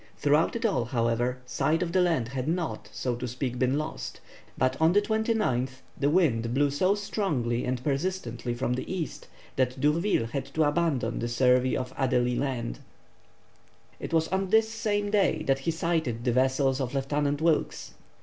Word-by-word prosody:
Throughout 150 +7 +2
it 230 - -2
all, 195 - +1
however, 120 +1 0
sight 160 +6 0
of 170 - -3
the 185 +1 +3
land 165 -10 +1
had 130 +1 -3
not, 170 0 -2
so 125 -2 -2
to 125 +1 -4
speak, 125 +1 -3
been 130 +2 +2
lost, 155 +1 -5 0.4
but 130 +1 +1
on 160 +2 +5
the 205 - +5
29th 210 - 0
the 140 - +1
wind 125 -9 +2
blew 145 +1 +3
so 185 +8 +2
strongly 150 - -1
and 125 0 -2
persistently 135 -6 -2
from 125 0 -1
the 130 - -4
east, 175 -5 -4 0.3
that 130 0 0
D'Urville 150 - +2
had 130 +4 -4
to 160 - +3
abandon 150 -3 0
the 120 - -2
survey 125 +1 +3
of 130 -1 -4
Adélie 125 -2 +1
Land. 120 - -3 1.2
It - - -6
was 160 -1 +2
on 190 0 -1
this 220 +2 +4
same 205 -2 -1
day 195 -7 +2
that 135 -3 +1
he 135 - -2
sighted 160 -8 -1
the 125 - +2
vessels 130 +2 +2
of 130 +1 -3
Lieutenant 145 +1 0
Wilkes. 160 -1 0
140 Hz, 175 wpm, -27 LUFS, 125-170 Hz, 1.2 s, on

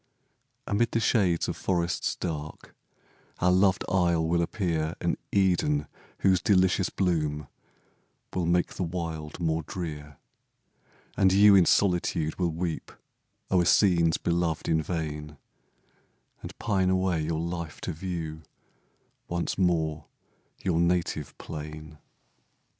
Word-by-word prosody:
Amid 115 +3 +1
the 115 - +2
shades 95 -6 +2
of - - -3
forests 85 -2 -1
dark, 75 -3 -6 0.6
Our 90 - +3
loved 95 +1 +3
isle 85 -3 +2
will 85 +1 +2
appear 85 -3 -1
An - - 0 0.2
Eden, 90 -7 +2 0.4
whose 95 -2 +3
delicious 95 -1 +3
bloom 75 -6 -1 0.9
Will 90 -3 -1
make 90 +1 +1
the - - -6
wild 80 -3 -5
more 80 -1 0
drear. 75 -4 -7 1.0
And 95 -1 +4
you 100 +2 +7
in 95 -3 +6
solitude 90 -4 +1
will 90 -2 +2
weep 85 0 -4 0.6
O'er 90 -2 +4
scenes 85 -3 +4
beloved 85 -2 -1
in 80 -1 +2
vain, 75 -2 -4 1.0
And - - -9
pine 95 -4 +1
away 95 -3 +1
your 80 +1 -2
life 85 -1 -4
to - - -3
view 80 -2 -5 0.9
Once 85 0 -2
more 80 -4 0 0.6
your 90 -3 +1
native 85 -3 0
plain. 75 0 -8
85 Hz, 120 wpm, -27 LUFS, 80-90 Hz, 1.0 s, you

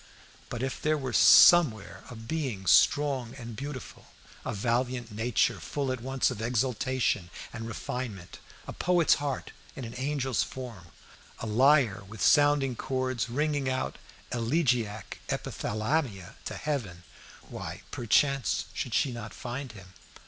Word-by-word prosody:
But 120 0 -4
if 130 - -3
there 155 0 +2
were 130 -4 -4
somewhere 140 - +6
a 120 - -8
being 115 -3 -4
strong 130 +3 +3
and 120 -4 -8
beautiful, 135 0 -8 0.4
a - - -3
valiant 120 +2 -1
nature, 110 -1 +1
full 135 - -3
at 130 -2 -4
once 135 +1 0
of 110 -4 -6
exaltation 120 -4 0 0.2
and 115 -1 -6
refinement, 115 -5 -6 0.3
a - - -7
poet's 175 -2 +3
heart 140 -2 -3 0.2
in 130 - -6
an 115 - -8
angel's 135 -1 -1
form, 120 -9 -6 0.5
a - - -6
lyre 125 -1 +4
with 110 +2 -11
sounding 145 -3 +4
chords 130 -2 -2
ringing 145 +1 0
out 130 0 -2 0.3
elegiac 115 - 0
epithalamia 110 - -2
to - - -5
heaven, 110 - -3 0.4
why, - - -7
perchance, 135 +2 +1
should - - -3
she 135 - +2
not 115 -2 -7
find 125 0 -6
him? 95 -3 -13
125 Hz, 135 wpm, -29 LUFS, 110-135 Hz, 0.5 s, somewhere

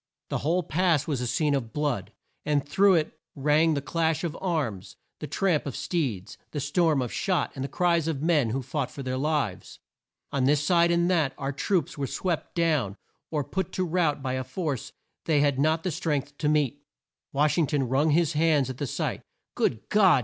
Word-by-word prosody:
The - - -1
whole 175 +5 +1
pass 165 -2 +1
was 140 -6 -2
a 125 - -1
scene 145 +5 +1
of 115 -5 -2
blood, 140 -10 -1 0.3
and 145 -1 0
through 195 +4 +4
it 155 -2 -1 0.2
rang 150 +3 +3
the 140 - -2
clash 165 +1 0
of 165 -2 -2
arms, 150 - -2 0.2
the 150 - -5
tramp 160 0 0
of 135 - -4
steeds, 120 - -3
the 150 - -4
storm 145 0 +2
of 120 - -5
shot, 185 -3 0
and 135 - -5
the - - -2
cries 170 -3 +1
of 160 -4 -1
men 150 -6 +2
who 130 +4 -2
fought 130 +1 -2
for 140 - -8
their 130 0 -2
lives. 145 -10 -2 0.5
On 135 -2 +1
this 145 +2 +3
side 170 +1 +4
and 170 0 +2
that, 155 -7 +2
our 140 -1 -2
troops 160 +1 -1
were 140 - -1
swept 175 +4 -3
down 155 - +1 0.3
or 150 -3 -1
put 185 +4 -3
to 185 - 0
rout 160 -5 0
by 130 -1 -1
a 130 0 -2
force 140 - -4 0.3
they 150 -3 +3
had 140 -2 +2
not 160 +3 +2
strength 145 -3 -2
to 150 - +1
meet. 145 -2 +1 0.5
Wash 150 +4 +2
ing 160 - +3
ton 140 -3 0
wrung 135 +5 +2
his 160 0 +2
hands 150 -4 +2
at 130 - -10
the 145 - -2
sight. - - -2 0.3
"Good 110 - -1
God!" 190 -9 +5
150 Hz, 200 wpm, -27 LUFS, 135-165 Hz, 0.5 s, God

